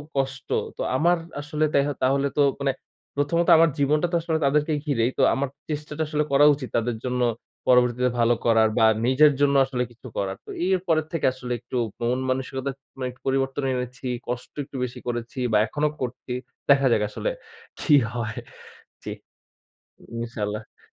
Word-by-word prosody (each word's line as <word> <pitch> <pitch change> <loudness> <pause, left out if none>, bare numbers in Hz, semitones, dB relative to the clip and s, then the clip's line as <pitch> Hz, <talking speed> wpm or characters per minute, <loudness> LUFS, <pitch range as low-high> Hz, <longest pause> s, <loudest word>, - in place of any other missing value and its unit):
কষ্ট 135 -2 -2 0.3
তো - - -4
আমার 175 +6 +3 0.2
আসলে 150 +1 0
তেহ 140 +1 +3 0.2
তাহলে 140 +2 +2
তো - - +5 0.2
মানে 140 -1 +1 0.4
প্রথমত 165 +4 +1
আমার 165 +1 +6
জীবনটা 150 +4 +2
তো 175 - +1
আসলে 160 -1 0
তাদেরকে 150 +3 +2
ঘিরেই 125 -5 +1
তো - - +2
আমার 135 0 -1 0.2
চেষ্টাটা 150 +1 -3
আসলে 150 0 0
করা 140 +1 +6
উচিত 135 -3 -6
তাদের 115 0 0
জন্য 125 0 -1 0.5
পরবর্তীতে 125 0 +4
ভালো 120 0 +4
করার 110 -1 +5
বা 115 - +5 0.2
নিজের 145 +3 +6
জন্য 140 -1 +4
আসলে 125 -2 -2
কিছু 120 +2 -13
করার। 95 -1 -2
তো - - -14 0.2
এর 190 -1 +3
পরের 155 -2 +2
থেকে 165 - 0
আসলে 125 -1 -7
একটু 120 +1 -5 0.2
মন 120 +2 +1
মানসিকতার 130 +1 -2 0.2
মানে 130 -1 -2
একটু 125 - -22
পরিবর্তন 135 +1 0
এনেছি। 125 +1 -5 0.2
কষ্ট 125 +1 -5
একটু 140 - -14
বেশি 125 - -8
করেছি 120 +1 -4
বা 105 - +4
এখনো 150 +7 0
করছি। 125 0 -4 0.4
দেখা 135 -1 +6
যাক 110 -2 +3
আসলে - - -2 0.5
কি 150 - +2 0.2
হয়! 115 -2 -3 0.7
জি, - - -5 1.1
ইনশাল্লাহ। 110 -2 -5
130 Hz, 165 wpm, -24 LUFS, 120-145 Hz, 1.1 s, আমার